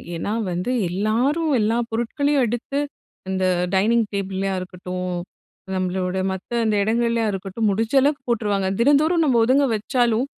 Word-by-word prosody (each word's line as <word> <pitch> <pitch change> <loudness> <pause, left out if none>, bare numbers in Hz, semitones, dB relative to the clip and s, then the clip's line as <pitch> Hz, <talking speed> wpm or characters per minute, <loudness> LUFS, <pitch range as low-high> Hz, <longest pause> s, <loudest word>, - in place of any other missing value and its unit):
ஏன்னா, 205 +6 -3 0.2
வந்து 180 +8 -2 0.2
எல்லாரும் 240 - 0
எல்லா 220 +2 +1
பொருட்களையும் 270 +5 +1
எடுத்து 240 +5 -3 0.5
இந்த 190 0 0 0.3
டைனிங் 225 +4 +3
டேபிள்ளையா 195 0 -2
இருக்கட்டும், 180 0 -5 0.7
நம்மளோட 185 0 -1
மத்த 190 +3 -7
அந்த 215 -1 +2
இடங்கள்லையா 230 +1 +1
இருக்கட்டும் 195 +3 -2
முடிஞ்ச 220 +4 -1
அளவுக்கு 285 +1 +1
போட்டுருவாங்க. 205 -4 0
தினந்தோறும் 300 +7 +4
நம்ம 260 -5 +3
ஒதுங்க 270 +4 +4
வச்சாலும் 235 +2 +1
220 Hz, 125 wpm, -22 LUFS, 190-250 Hz, 0.7 s, தினந்தோறும்